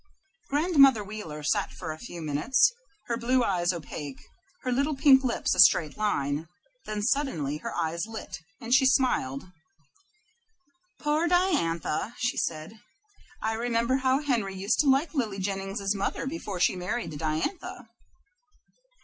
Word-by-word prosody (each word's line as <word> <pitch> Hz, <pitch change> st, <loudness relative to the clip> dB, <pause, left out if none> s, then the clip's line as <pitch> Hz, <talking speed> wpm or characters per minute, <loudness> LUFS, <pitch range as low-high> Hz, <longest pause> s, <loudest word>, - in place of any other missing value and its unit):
Grandmother 275 Hz, -, +5 dB
Wheeler 195 Hz, -8 st, -7 dB
sat 150 Hz, -, 0 dB
for 160 Hz, -, -6 dB
a 155 Hz, -, -8 dB
few 175 Hz, -8 st, -8 dB
minutes, 155 Hz, -, +3 dB, 0.3 s
her 235 Hz, -, -2 dB
blue 250 Hz, +2 st, +2 dB
eyes 180 Hz, -4 st, +1 dB
opaque, 145 Hz, -5 st, -7 dB, 0.4 s
her 255 Hz, -, -1 dB
little 280 Hz, +4 st, +1 dB
pink 270 Hz, -1 st, +6 dB
lips 245 Hz, -2 st, 0 dB
a -, -, -3 dB
straight 155 Hz, -3 st, +6 dB
line; 155 Hz, -7 st, -1 dB, 0.4 s
then 210 Hz, -1 st, -3 dB
suddenly 205 Hz, -, 0 dB
her -, -, -6 dB
eyes 170 Hz, +3 st, -2 dB
lit, 220 Hz, -5 st, -7 dB, 0.2 s
and 235 Hz, +1 st, -2 dB
she 265 Hz, 0 st, +6 dB
smiled. 185 Hz, -, +1 dB, 1.5 s
"Poor 300 Hz, +3 st, +1 dB
Diantha," 245 Hz, -, 0 dB, 0.2 s
said 155 Hz, +1 st, -3 dB
she, 220 Hz, -, -18 dB, 0.6 s
"I 220 Hz, -, 0 dB
remember 235 Hz, +2 st, 0 dB
how 265 Hz, +1 st, +1 dB
Henry 225 Hz, -9 st, -1 dB
used 195 Hz, +3 st, 0 dB
to 295 Hz, -, +4 dB
like 280 Hz, +3 st, +2 dB
Lily 225 Hz, -9 st, -1 dB
Jennings's 195 Hz, +1 st, -2 dB
mother 200 Hz, +5 st, -2 dB
before 265 Hz, -, -5 dB
he 175 Hz, -, +2 dB
married 180 Hz, +1 st, -3 dB
Diantha. 160 Hz, -, -3 dB
215 Hz, 140 wpm, -27 LUFS, 170-265 Hz, 1.5 s, pink